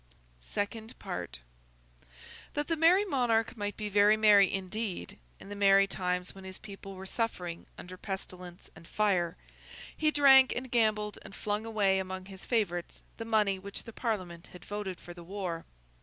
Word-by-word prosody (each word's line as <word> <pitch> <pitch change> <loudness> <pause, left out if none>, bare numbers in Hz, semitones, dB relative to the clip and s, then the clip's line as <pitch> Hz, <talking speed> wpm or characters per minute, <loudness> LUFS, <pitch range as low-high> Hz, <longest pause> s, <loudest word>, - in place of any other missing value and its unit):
SECOND 215 - -4
PART - - -6 1.1
That 295 0 0
the 330 - 0
Merry 345 +6 +5
Monarch 245 - +1
might 205 -2 -4
be 210 - -3
very 205 +1 +5
merry 205 -3 +6
indeed, 195 - -4 0.2
in - - -12
the 205 - -6
merry 195 -1 +6
times 180 -2 -2
when 195 - -12
his 190 0 -8
people 195 -2 -10
were 190 +1 -8
suffering 185 -6 -3
under 185 +1 -9
pestilence 180 -2 -7
and 165 - -14
fire, 180 -5 +1 0.6
he 310 - +2
drank 270 -3 +7
and 255 0 -5
gambled 215 -3 +1
and 195 - -11
flung 210 +2 -2
away 200 -4 +2
among 185 0 -5
his 190 -1 -11
favourites 185 -8 -1
the 225 - -5
money 210 -4 +2
which 200 +1 -8
the 230 - -10
Parliament 185 -9 -3
had 180 -1 -13
voted 205 -3 -4
for 175 - -10
the 175 0 -11
war. 180 -2 -4
200 Hz, 165 wpm, -31 LUFS, 185-225 Hz, 1.1 s, drank